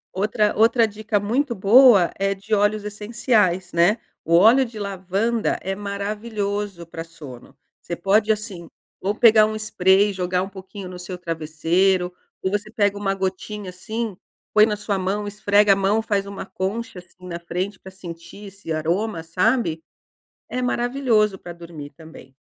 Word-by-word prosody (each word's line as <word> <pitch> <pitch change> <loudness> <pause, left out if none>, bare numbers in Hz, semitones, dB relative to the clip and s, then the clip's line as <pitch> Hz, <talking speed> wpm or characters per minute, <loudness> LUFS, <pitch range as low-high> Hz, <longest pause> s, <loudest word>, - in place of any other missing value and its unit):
Outra 210 +2 +1
outra 225 +1 +4
dica 215 0 -2
muito 235 +5 -1
boa 205 -2 +6
é 195 0 +1
de 200 +3 -6
óleos 205 +1 +2
essenciais, 210 -4 0
né. 175 +6 +4 0.3
O 170 +1 +2
óleo 225 +9 +6
de 230 -3 -8
lavanda 200 +3 -1
é 195 - -3
maravilhoso 205 -2 -4
pra 165 0 -7
sono. 150 -7 -13 0.2
Você 170 - -5
pode, 205 +5 +2
assim, 205 -6 -4 0.3
ou 200 +2 -1
pegar 215 -2 +6
um 215 - -4
spray 205 -2 +3
e - - -7
jogar 180 0 -1
um - - -5
pouquinho 190 0 -9
no 180 0 -9
seu 180 0 -6
travesseiro. 175 +3 0 0.3
Ou 190 - 0
você 205 +1 -2
pega 205 -2 +1
uma 195 -1 -1
gotinha, 190 +1 -4
assim, 215 +3 -5 0.4
põe 215 0 +7
na 210 - -1
sua 205 -1 -2
mão, 200 +3 -2
esfrega 205 0 +3
a - - +1
mão, 195 +2 +1
faz 200 -2 -1
uma 200 -1 -7
concha, 195 +3 -4
assim, 180 0 -17
na 170 -1 -5
frente 180 +4 -4
pra 190 - -12
sentir 175 +2 -10
esse 195 -4 -9
aroma, 165 +4 -1
sabe. 170 -1 0 0.7
É 255 - -3
maravilhoso 240 -5 +1
pra 175 - -9
dormir 165 -4 -10
também. 160 -5 -14
200 Hz, 165 wpm, -22 LUFS, 180-215 Hz, 0.7 s, põe